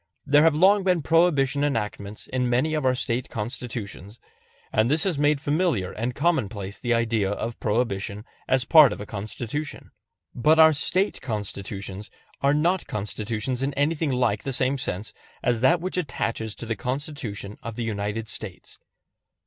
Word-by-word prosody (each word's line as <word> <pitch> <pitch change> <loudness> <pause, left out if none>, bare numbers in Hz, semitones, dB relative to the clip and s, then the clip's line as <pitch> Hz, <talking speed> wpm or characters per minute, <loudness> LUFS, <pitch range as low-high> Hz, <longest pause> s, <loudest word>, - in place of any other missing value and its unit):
There 145 +1 +5
have 160 -1 +5
long 195 +5 +5
been 180 -4 +2
Prohibition 150 -4 +3
enactments 105 -6 -3
in 125 -1 -1
many 130 +6 +1
of 150 -4 +1
our 130 - +3
State 125 0 -2
Constitutions, 115 -2 -6 0.5
and 110 +2 +3
this 155 +3 +2
has 180 -7 0
made 145 0 +3
familiar 145 - 0
and 120 +3 -3
commonplace 110 - -1
the 120 - -2
idea 115 -4 +1
of 115 +3 -4
Prohibition 105 -2 -1 0.2
as 130 -1 +2
part 150 -4 +8
of - - -8
a 105 - -6
Constitution. 115 +8 -5 0.4
But 155 +6 +3
our 160 0 +8
State 185 +7 +1
Constitutions 100 -3 -5 0.3
are 140 +1 +3
not 175 +4 +1
Constitutions 110 +4 -3
in 135 +1 -1
anything 150 +2 +1
like 125 -5 +1
the 135 - -3
same 130 +2 +1
sense 100 -2 -4 0.3
as 120 -2 +1
that 165 +7 +4
which 185 +1 -3
attaches 115 -8 -3
to - - -6
the 115 0 -2
Constitution 125 -5 -5
of 115 -1 -6
the 120 - -3
United 105 0 -3
States. 105 -4 -7
125 Hz, 160 wpm, -25 LUFS, 105-150 Hz, 0.5 s, part